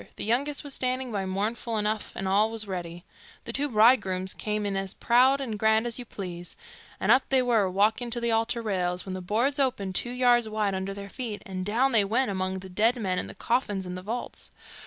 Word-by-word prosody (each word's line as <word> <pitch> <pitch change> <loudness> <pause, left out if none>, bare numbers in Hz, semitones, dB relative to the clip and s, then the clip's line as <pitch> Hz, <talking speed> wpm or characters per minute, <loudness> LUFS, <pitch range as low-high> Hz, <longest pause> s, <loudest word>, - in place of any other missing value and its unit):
The - - -5
youngest 275 +7 0
was 285 -2 -6
standing 255 -1 -1
by 195 -3 -2
mournful 215 +4 -2
enough, 210 0 -1
and 195 - -3
all 205 +3 +3
was 225 -1 -4
ready. 175 -2 -5 0.4
The - - -5
two 290 +1 0
bridegrooms 210 -5 +3
came 210 -1 -2
in 200 -1 -1
as 195 -1 -3
proud 255 +3 +4
and 225 -6 -4
grand 220 +1 +3
as 240 +1 -2
you 245 - -6
please, 175 -5 -6 0.4
and - - +2
up 265 - +6
they 265 -1 +3
were 225 -6 +2
walking 215 +6 +1
to 240 +1 -2
the 235 0 0
altar 225 +1 0
rails, 180 -4 -1
when 190 - -5
the 185 - -5
boards 235 +10 +1
opened 245 -8 0
two 240 - +2
yards 245 -2 +3
wide 215 -2 0
under 190 +1 -3
their 200 0 -7
feet, 225 -1 -5
and 185 -1 -5
down 235 +7 +2
they 220 -4 +5
went 225 +4 +1
among 190 0 -2
the 190 - -9
dead 220 +6 +2
men 190 -6 -1
and - - -5
the - - -10
coffins 210 -6 -1
in 180 - -5
the 180 - -6
vaults. 225 +6 -5
215 Hz, 225 wpm, -27 LUFS, 190-240 Hz, 0.4 s, up